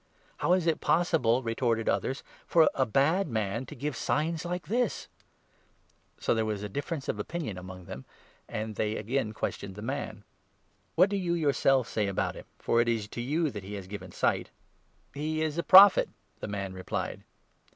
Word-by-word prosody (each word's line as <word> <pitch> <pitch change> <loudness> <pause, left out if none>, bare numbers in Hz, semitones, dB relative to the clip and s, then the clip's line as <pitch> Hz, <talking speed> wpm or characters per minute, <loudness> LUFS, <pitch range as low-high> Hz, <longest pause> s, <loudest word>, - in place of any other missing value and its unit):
" - - -33
How 175 - +3
is 180 -2 +2
it 165 -2 +1
possible," 130 -8 +2
retorted 115 -1 0
others, 135 - 0
" - - -27
for 160 -2 +5
a 130 -2 +1
bad 155 - +2
man 110 0 -2
to - - -9
give 150 -2 -3
signs 160 +7 -1
like 180 0 -4
this? 235 +1 0 0.5
" - - -38
So - - +1
there 110 -1 +1
was 105 -2 -3
a - - -2
difference 145 - -4
of 105 - -2
opinion 140 - -4
among 90 0 -9
them, 65 -5 -8 0.4
and 110 0 -4
they 105 0 0
17 - - -3
again 115 0 -1
questioned 100 -3 -4
the 105 - -8
man: 115 -4 -4 0.4
" - - -41
What 185 +4 +5
do 200 - +1
you 175 -3 0
yourself 135 -5 +2
say 105 -2 -1
about 100 - -1
him, - - -10
for 115 - +2
it 120 - +1
is 110 -3 -1
to 120 - -5
you 150 +5 0
that 105 -4 -7
he 100 +2 -6
has 100 -2 -6
given 100 +2 -8
sight? - - 0 0.3
" - - -39
He 155 +3 -2
is 155 +1 -2
a - - +3
Prophet," 195 +1 +8 0.3
the - - -5
man 100 -2 -4
replied. 95 0 -4
125 Hz, 205 wpm, -29 LUFS, 105-160 Hz, 0.5 s, Prophet